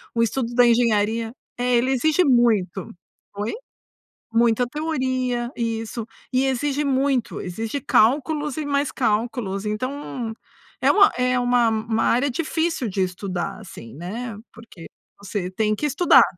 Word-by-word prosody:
O 230 - +3
estudo 240 +1 -1
da 245 0 +6
engenharia 230 -1 +2 0.3
é, 245 0 +1
ele 245 +2 +2
exige 310 +7 +3
muito. 220 - +2 0.5
Oi? 205 +2 -2 0.8
Muita 235 +1 +3
teoria, 255 -4 -2
isso. 225 -1 -3 0.3
E 260 +1 +3
exige 275 +2 0
muito, 270 -2 0
exige 225 +9 -4
cálculos 290 +6 +2
e 310 - -2
mais 285 0 0
cálculos, 215 -3 -1
então 245 +1 -4 0.5
é - - +4
uma 405 0 +6
é 250 0 +2
uma 245 -1 +3
uma 220 0 -1
área 255 +4 +2
difícil 320 -2 -1
de 195 0 -1
estudar, 185 +1 -4
assim, 185 - -11
né. 210 +7 -6 0.2
Porque 220 -7 -12 0.3
você 195 -2 -4
tem 215 +2 0
que 300 - -3
estudar, 300 +5 +6
240 Hz, 135 wpm, -23 LUFS, 215-265 Hz, 0.8 s, da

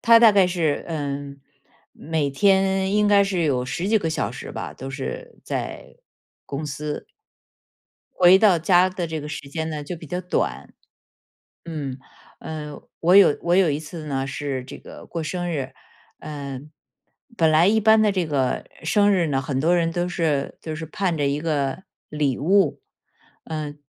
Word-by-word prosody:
他 230 -1 +7
大 230 -2 +7
概 195 -2 +5
是， 165 -5 -1
嗯， 140 -3 -4 0.5
每 155 -2 -2
天 190 +3 +2
应 210 0 +3
该 205 -1 +5
是 190 -3 -1
有 130 -5 +1
十 165 +9 -3
几 220 +1 +4
个 165 - -2
小 160 - -1
时 - - -8
吧， - - -6
都 135 - -8
是 485 - -6
在 - - -5 0.5
公 140 +2 -4
司， 150 0 -5 1.0
回 185 +1 +6
到 195 -4 +5
家 180 +2 +4
的 180 -2 -4
这 160 -1 -4
个 150 - -7
时 145 -2 -7
间 160 +3 -3
呢 150 -1 -4
就 170 +4 -6
比 160 - -11
较 180 +5 -3
短。 180 0 -2 0.9
嗯， 145 -6 -5 0.4
呃， 150 -2 -7 0.2
我 175 +3 +5
有 185 -7 +7
我 175 +1 +2
有 185 -5 +4
一 145 +1 -2
次 160 +1 -8
呢 135 -2 -2
是 135 -1 -4
这 130 - -9
个 - - -12
过 165 - -4
生 175 +3 -3
日， 135 -4 -3 0.5
嗯， 145 -1 -7 0.6
本 165 -5 +4
来 165 +5 +5
一 220 - +3
般 220 0 +5
的 210 - +4
这 185 -4 -1
个 135 -4 -1 0.2
生 205 +5 +3
日 175 -4 +2
呢， 135 -2 0
很 135 -1 -2
多 170 +5 +3
人 165 -1 +1
都 175 +1 -1
是 160 -5 -1
都 160 -1 -5
是 160 +1 -5
盼 175 +2 -1
着 145 - 0
一 140 +1 0
个 150 +1 -2 0.2
礼 145 -4 0
物。 185 0 +2 0.6
嗯， 150 -2 -5
160 Hz, 190 characters per minute, -23 LUFS, 145-185 Hz, 1.0 s, 他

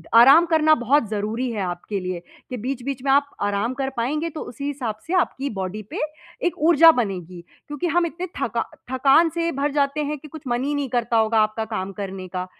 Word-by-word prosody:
आराम 270 +9 +8
करना 315 -1 +5
बहुत 250 0 +3
ज़रूरी 220 +4 -2
है, 210 -3 -3
आपके 180 +3 -3
लिए 185 -1 -4 0.3
कि 250 - -4
बीच-बीच 255 +2 -4
में 275 - +2
आप 285 +1 +4 0.2
आराम 205 +4 0
कर 270 -1 0
पाएँगे 300 +8 -1
तो 315 - -7
उसी 250 +4 -7
हिसाब 260 -7 -3
से 345 - -3
आपकी 280 -6 0
बॉडी 190 +3 -4
पे - - -4 0.5
एक - - -3
ऊर्जा 330 0 +8
बनेगी। 185 - -3 0.2
क्योंकि 295 +4 -3
हम 345 +1 +2
इतने 350 +2 -5
थका - - 0 0.3
थकान 275 +6 +4
से 335 +1 -1
भर 280 +1 -1
जाते 285 +1 0
हैं 300 +1 -3
कि 300 - -12
कुछ 310 0 -11
मन 240 +1 0
ही 290 +2 -1
नहीं 285 -2 -2
करता 235 -1 0
होगा 220 0 +3
आपका 215 +1 0
काम 190 -1 -3
करने 190 -1 -6
का। 180 0 -4
260 Hz, 210 wpm, -23 LUFS, 215-295 Hz, 0.5 s, आराम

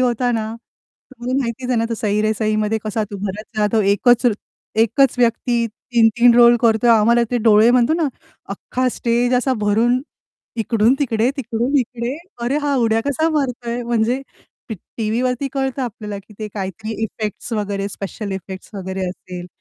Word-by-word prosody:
होता 245 0 +1
ना, 220 0 -2 0.6
तुम्हाला 250 +2 -2
माहितीच 245 +1 -4
आहे 245 - +2
ना 230 - +1
तो - - 0
"सही 210 -1 0
रे 215 0 +2
सही" 215 -1 +1
मध्ये 220 +1 0
कसा 215 0 -1
तो 200 - -5
भरत 210 +3 -5
जाधव 210 +1 +2
एकच 245 +4 +3
र 235 - +4 0.5
एकच 235 +4 +3
व्यक्ती 235 0 +1
3-3 235 +1 +3
रोल 240 0 +7
करतोय, 230 +1 +4
आम्हाला 230 +2 +5
ते 245 - +1
डोळे 220 +1 +6
म्हणतो 250 +5 +3
ना 325 -4 +1 0.5
अख्खा 255 +5 -2
स्टेज 240 +1 +1
असा 255 +1 +2
भरून, 230 +5 +2 0.6
इकडून 225 +2 +2
तिकडे, 235 -3 +1
तिकडून 245 +2 -1
इकडे 245 +2 -4 0.3
अरे, 270 +4 0
हा 290 -1 0
उड्या 225 -2 +2
कसा 315 +3 +1
मारतोय? 245 -3 -3
म्हणजे 235 +2 0 0.5
टी 220 - -3 0.2
टीव्हीवरती 250 +5 -1
कळतं 270 -1 -2
आपल्याला 210 -3 -5
की 210 +2 -16
ते 215 -1 -4
काहीतरी 205 +3 -5
इफेक्ट्स 215 +2 -5
वगैरे, 200 -2 -2
स्पेशल 200 +1 -6
इफेक्ट्स 190 0 -7
वगैरे 190 -1 -3
असेल. 180 -1 -8
230 Hz, 165 wpm, -19 LUFS, 215-245 Hz, 0.6 s, रोल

